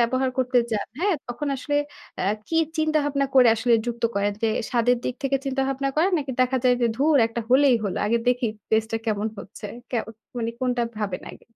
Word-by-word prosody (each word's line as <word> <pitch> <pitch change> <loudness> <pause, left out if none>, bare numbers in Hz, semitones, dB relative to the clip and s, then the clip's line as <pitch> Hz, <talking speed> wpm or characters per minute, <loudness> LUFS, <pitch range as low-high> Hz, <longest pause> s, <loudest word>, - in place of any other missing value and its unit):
ব্যবহার 255 +2 +2
করতে 255 -1 +3
যান 210 - -1
হ্যাঁ? 390 -1 +2
তখন 270 +5 -4
আসলে 290 +2 -2 0.4
অ্যা 195 +2 +1 0.2
কি 325 - -1 0.2
চিন্তা 310 0 +2
ভাবনা 280 -1 0
করে 255 -2 +7
আসলে 230 +1 +2
যুক্ত 235 0 -4
করেন? 200 +1 +1
যে 225 - +3 0.2
স্বাদের 245 0 +3
দিক 250 - -1
থেকে 275 0 +2
চিন্তাভাবনা 270 0 -1
করেন? 340 +5 +3
নাকি 275 -3 -4
দেখা 255 +1 +2
যায় 250 -1 +5
যে, 240 - +3
"ধুর 295 +3 +3
একটা 230 +1 -4
হলেই 260 0 +5
হল, 190 - -2
আগে 235 +2 +2
দেখি 245 -1 +2 0.2
টেস্টটা 220 +1 +1
কেমন 210 -1 0
হচ্ছে"? 200 - -8 0.2
কে 250 - -1 0.4
মানে 230 -1 -1
কোনটা 250 -1 +1 0.2
ভাবেন 200 -4 -3
আগে? - - -15
250 Hz, 195 wpm, -24 LUFS, 230-275 Hz, 0.4 s, করে